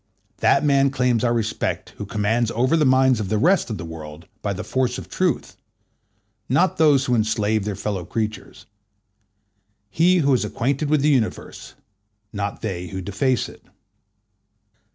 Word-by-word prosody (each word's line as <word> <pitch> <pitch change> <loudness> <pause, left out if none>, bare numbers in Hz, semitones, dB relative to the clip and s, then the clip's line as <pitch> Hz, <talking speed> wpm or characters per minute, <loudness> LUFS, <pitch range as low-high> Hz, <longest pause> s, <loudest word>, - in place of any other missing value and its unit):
That 140 - +3
man 140 -1 +4
claims 125 -4 +1
our 120 - +2
respect 115 -2 -2
who 105 - -6
commands 110 +3 0
over 130 +7 +2
the 155 -2 +3
minds 130 -2 +4
of 100 -3 -3
the 110 - +1
rest 175 - +2
of 110 - -3
the 85 - -7
world 80 -1 -9 0.2
by 100 - -2
the 100 - -4
force 130 -1 -1
of - - -8
truth, - - -1 0.9
not 170 +9 +2
those 145 -4 +4
who 125 - 0
enslave 110 -2 +1
their 105 -2 -3
fellow 100 -2 -3
creatures: 110 +3 -5 1.3
he 180 +3 +3
who 140 -5 +3
is 125 - +2
acquainted 140 +4 -1
with 150 -2 +3
the 150 - +4
universe, 125 -7 -2 0.6
not 100 0 -4
they 90 -4 -4
who 95 +3 -6
deface 100 +6 0
it. - - -15
115 Hz, 160 wpm, -22 LUFS, 105-135 Hz, 1.3 s, man